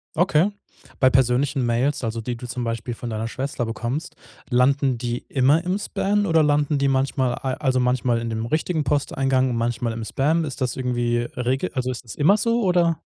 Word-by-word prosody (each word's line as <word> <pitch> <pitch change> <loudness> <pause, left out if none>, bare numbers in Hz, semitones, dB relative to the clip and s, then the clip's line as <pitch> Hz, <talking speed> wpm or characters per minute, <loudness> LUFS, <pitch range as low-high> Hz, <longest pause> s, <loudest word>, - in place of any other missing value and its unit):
Okay. 175 +2 +3 0.5
Bei 130 - +6
persönlichen 130 +1 +2
Mails, 125 +4 0
also, 115 0 -2
die 120 +2 -3
du 120 - -9
zum 125 0 -4
Beispiel 115 +1 -3
von 120 +1 -6
deiner 110 +1 -3
Schwester 130 0 -3
bekommst, 120 +8 -4 0.3
landen 130 +1 +2
die 120 0 -3
immer 140 +5 +3
im 180 +2 0
Spam 205 0 0
oder 165 -4 +3
landen 145 0 +2
die 140 0 +2
manchmal, 130 -2 +1
al 130 -1 -3
also, 130 -4 0
manchmal 125 -1 +1
in 115 0 -4
dem 110 0 -3
richtigen 155 +4 0
Posteingang 135 -2 +1
und 120 - -2
manchmal 115 0 -1
im 115 0 -5
Spam? 155 +8 +1
Ist 140 - -6
das 125 -1 0
irgendwie 120 -2 0 0.2
Regel 130 +8 -1
also, 130 -1 -1
ist 125 -1 -5
es 115 - -8
immer 165 +8 +4
so, 230 +2 +1
oder? 175 -4 +2
130 Hz, 195 wpm, -23 LUFS, 120-150 Hz, 0.5 s, Bei